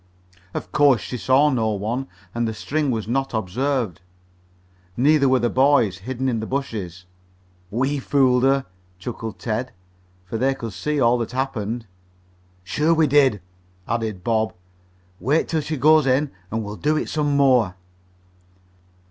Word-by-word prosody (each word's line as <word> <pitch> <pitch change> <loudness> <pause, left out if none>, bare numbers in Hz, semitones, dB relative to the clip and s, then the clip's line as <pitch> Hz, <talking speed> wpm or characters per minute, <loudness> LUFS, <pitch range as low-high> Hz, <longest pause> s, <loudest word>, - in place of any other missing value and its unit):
Of 90 - -5
course 140 -5 +4
she 95 +7 -6
saw 130 +4 +3
no 115 -4 +1
one, 115 +7 -3 0.3
and 120 0 -1
the 110 - -4
string 145 +6 -1
was 110 -4 -2
not 135 +1 -1
observed. 110 -1 -1 1.0
Neither 140 +2 +4
were 130 - +4
the 120 - +1
boys, 130 -9 +3
hidden 130 +5 -3
in 120 -3 0
the 110 - -4
bushes. 105 -10 -4 0.6
"We 130 +7 0
fooled 130 -2 +3
her," 135 +1 +2 0.3
chuckled 110 +3 -6
Ted, 120 +3 -3 0.5
for 110 +5 -4
they 135 +2 +2
could 115 -5 -6
see 150 +7 -2
all 120 -1 +3
that 115 +1 -4
happened. 120 -3 -2 0.8
"Sure 150 - +1
we 160 -1 +4
did," 135 -7 +3 0.5
added 110 -5 -2
Bob. 110 -1 0 0.6
"Wait 145 +6 +1
till 160 -2 0
she 150 +1 -4
goes 155 +1 +5
in 135 +3 +2 0.2
and 110 +1 -2
we'll 105 +1 -6
do 155 +1 +1
it - - -2
some 145 -2 0
more." 125 -9 +3
125 Hz, 150 wpm, -22 LUFS, 110-140 Hz, 1.0 s, goes